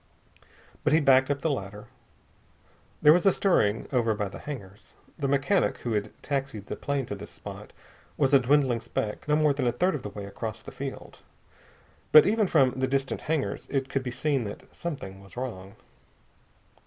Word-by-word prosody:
But 150 Hz, -, +2 dB
he 155 Hz, -, +6 dB
backed 135 Hz, -2 st, +5 dB
up 140 Hz, 0 st, -1 dB
the 160 Hz, -, +1 dB
ladder. 105 Hz, -4 st, -5 dB, 1.2 s
There 150 Hz, -, +9 dB
was 180 Hz, +3 st, +3 dB
a -, -, +7 dB
stirring 115 Hz, -, +2 dB
over 115 Hz, -4 st, +2 dB
by 105 Hz, -2 st, -2 dB
the -, -, -9 dB
hangars. 105 Hz, -9 st, -9 dB, 0.3 s
The 140 Hz, -, 0 dB
mechanic 140 Hz, +8 st, +2 dB
who 120 Hz, -, -3 dB
had 105 Hz, 0 st, -1 dB
taxied 135 Hz, -7 st, -3 dB
the -, -, -5 dB
plane 140 Hz, -2 st, -2 dB
to 105 Hz, -, -5 dB
this 100 Hz, 0 st, -8 dB
spot -, -, -10 dB, 0.5 s
was 135 Hz, -1 st, +2 dB
a 140 Hz, -, +8 dB
dwindling 130 Hz, -2 st, +2 dB
speck, 110 Hz, +1 st, -4 dB
no 150 Hz, -, +3 dB
more 150 Hz, -1 st, +3 dB
than 135 Hz, -3 st, -1 dB
a -, -, +3 dB
third 180 Hz, +8 st, +1 dB
of 145 Hz, -, -3 dB
the 105 Hz, -, -6 dB
way 100 Hz, 0 st, -7 dB
across 110 Hz, +3 st, -6 dB
the -, -, -9 dB
field. 135 Hz, 0 st, -7 dB, 0.9 s
But 155 Hz, -, +9 dB
even 215 Hz, 0 st, +2 dB
from 130 Hz, -6 st, +4 dB
the 130 Hz, -, +1 dB
distant 135 Hz, 0 st, -1 dB
hangars 155 Hz, -2 st, -2 dB
it 135 Hz, -1 st, -1 dB
could 135 Hz, -1 st, -1 dB
be 130 Hz, -, -4 dB
seen 135 Hz, +1 st, 0 dB
that 100 Hz, -, -9 dB
something 115 Hz, -, -6 dB
was 100 Hz, +4 st, -16 dB
wrong. 100 Hz, -6 st, -6 dB
135 Hz, 190 wpm, -27 LUFS, 110-145 Hz, 1.2 s, There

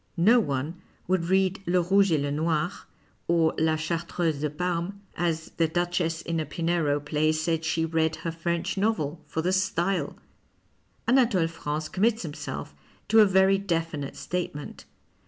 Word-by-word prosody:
No 220 Hz, +9 st, +6 dB
one 150 Hz, -, -2 dB, 0.3 s
would 180 Hz, -2 st, +1 dB
read 190 Hz, +2 st, +2 dB
" -, -, -32 dB
Le 180 Hz, +1 st, +3 dB
Rouge 195 Hz, +2 st, +3 dB
et 155 Hz, -, +3 dB
le 140 Hz, 0 st, -1 dB
Noir 160 Hz, +3 st, 0 dB, 0.3 s
" -, -, -35 dB, 0.2 s
or 165 Hz, -1 st, +3 dB
" -, -, -19 dB
La 160 Hz, 0 st, +3 dB
Chartreuse 165 Hz, 0 st, -1 dB
de 150 Hz, -, 0 dB
Parme," 180 Hz, +4 st, -2 dB, 0.2 s
as 165 Hz, -2 st, -1 dB
the 165 Hz, -, +3 dB
Duchess 170 Hz, -1 st, -1 dB
in 165 Hz, -1 st, -2 dB
a 155 Hz, -, -1 dB
Pinero 165 Hz, -3 st, 0 dB
play 150 Hz, +1 st, +1 dB
said 155 Hz, +1 st, -1 dB
she 160 Hz, 0 st, 0 dB
read 160 Hz, -1 st, +1 dB
her 165 Hz, -, -4 dB
French 170 Hz, +3 st, -2 dB
novel, 170 Hz, -7 st, 0 dB
for 160 Hz, -, -2 dB
the 180 Hz, +2 st, +1 dB
style. 190 Hz, 0 st, 0 dB, 0.9 s
xVnatole 230 Hz, -10 st, +3 dB
France 155 Hz, -2 st, -3 dB
commits 220 Hz, +6 st, +1 dB
himself 150 Hz, -, -6 dB, 0.4 s
to 220 Hz, +1 st, +6 dB
a 210 Hz, -, +8 dB
very 190 Hz, 0 st, +4 dB
definite 165 Hz, -7 st, -2 dB
statement. 175 Hz, -5 st, -5 dB
170 Hz, 165 wpm, -27 LUFS, 160-185 Hz, 0.9 s, a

